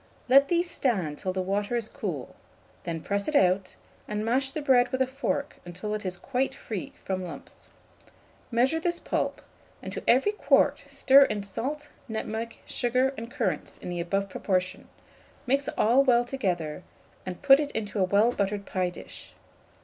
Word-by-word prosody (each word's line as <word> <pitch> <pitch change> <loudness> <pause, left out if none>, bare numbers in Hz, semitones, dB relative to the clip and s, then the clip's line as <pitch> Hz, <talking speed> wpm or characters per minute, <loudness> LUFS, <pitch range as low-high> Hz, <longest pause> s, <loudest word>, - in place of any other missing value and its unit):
Let 275 +2 +6
these 345 +2 +1
stand 190 - -1
till 185 - -2
the 185 0 -2
water 205 +4 -1
is 230 -2 -1
cool; - - -5 0.5
then 165 -2 -3
press 200 0 -1
it 305 - -2
out, 185 -3 +3 0.3
and 210 0 -2
mash 260 +4 +1
the 305 - -4
bread 255 -4 +4
with 260 - -1
a 260 - +4
fork 275 +2 -3
until 180 +5 -5
it 215 - -3
is 180 -1 -4
quite 265 +4 -1
free 210 -5 -6
from 185 -1 -4
lumps. 175 - -10 0.8
Measure 260 +6 +2
this 345 +1 -1
pulp, - - -2 0.4
and - - -7
to - - -4
every 265 +12 +4
quart 420 - +2
stir 275 +1 +6
in 210 -4 -3
salt, 265 +10 -5 0.2
nutmeg, 220 0 -4
sugar, 255 +2 +1
and 230 -1 -7
currants 225 -6 -2
in - - -8
the 175 -1 -3
above 195 +3 -1
proportion; 185 -1 -2 0.6
mix 275 +2 +1
all 245 +5 +5
well 245 -2 +4
together, 180 - -2 0.4
and 185 +5 -7
put 275 -1 +8
it 295 -1 -1
into 210 -1 -3
a - - +4
well 205 +5 +3
buttered 200 -2 -2
pie 185 -1 -1
dish. 175 - -11
225 Hz, 170 wpm, -27 LUFS, 190-265 Hz, 0.8 s, put